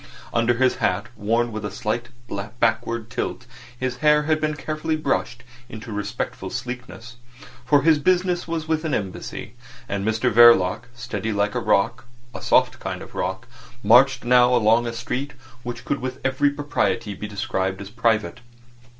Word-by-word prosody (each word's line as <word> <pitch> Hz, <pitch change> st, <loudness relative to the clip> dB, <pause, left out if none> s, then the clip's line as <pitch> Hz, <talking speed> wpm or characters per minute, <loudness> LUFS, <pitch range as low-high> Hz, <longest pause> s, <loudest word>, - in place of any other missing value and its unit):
Under 120 Hz, +1 st, +2 dB
his 130 Hz, +1 st, +2 dB
hat, 105 Hz, -4 st, 0 dB
worn 115 Hz, +3 st, 0 dB
with 110 Hz, -1 st, -5 dB
a 105 Hz, -, -2 dB
slight 120 Hz, 0 st, -3 dB, 0.5 s
backward 115 Hz, 0 st, 0 dB
tilt, -, -, -3 dB, 0.3 s
his 130 Hz, -1 st, -2 dB
hair 150 Hz, +2 st, +4 dB
had 155 Hz, 0 st, +1 dB
been 155 Hz, -1 st, 0 dB
carefully 155 Hz, +1 st, -2 dB
brushed 120 Hz, -5 st, -2 dB, 0.3 s
into 110 Hz, +1 st, -8 dB
respectful 105 Hz, 0 st, -4 dB
sleekness; 120 Hz, -1 st, -7 dB, 0.5 s
for 145 Hz, -2 st, +4 dB
his 160 Hz, -1 st, +5 dB
business 180 Hz, +2 st, +1 dB
was 165 Hz, -1 st, -3 dB
with 160 Hz, 0 st, 0 dB
an 160 Hz, -, 0 dB
Embassy. 100 Hz, +2 st, -5 dB, 0.3 s
And 100 Hz, 0 st, -2 dB
Mr 110 Hz, +3 st, +1 dB
Verloc, 115 Hz, -2 st, +6 dB
steady 120 Hz, -2 st, -4 dB
like 105 Hz, 0 st, 0 dB
a -, -, 0 dB
rock—a 120 Hz, +3 st, -1 dB
soft -, -, +3 dB
kind -, -, -5 dB
of -, -, -13 dB
rock—marched 120 Hz, +5 st, +1 dB
now 125 Hz, 0 st, +5 dB
along 115 Hz, +1 st, +3 dB
a 115 Hz, -, -3 dB
street 125 Hz, +5 st, -4 dB, 0.3 s
which 120 Hz, -1 st, -7 dB
could 140 Hz, -, -1 dB
with 130 Hz, +1 st, -4 dB
every 135 Hz, +2 st, +2 dB
propriety 115 Hz, -7 st, -1 dB
be 105 Hz, +2 st, -6 dB
described 95 Hz, -3 st, -2 dB
as 100 Hz, 0 st, -8 dB
private. 110 Hz, -6 st, 0 dB
120 Hz, 155 wpm, -23 LUFS, 110-130 Hz, 0.5 s, Verloc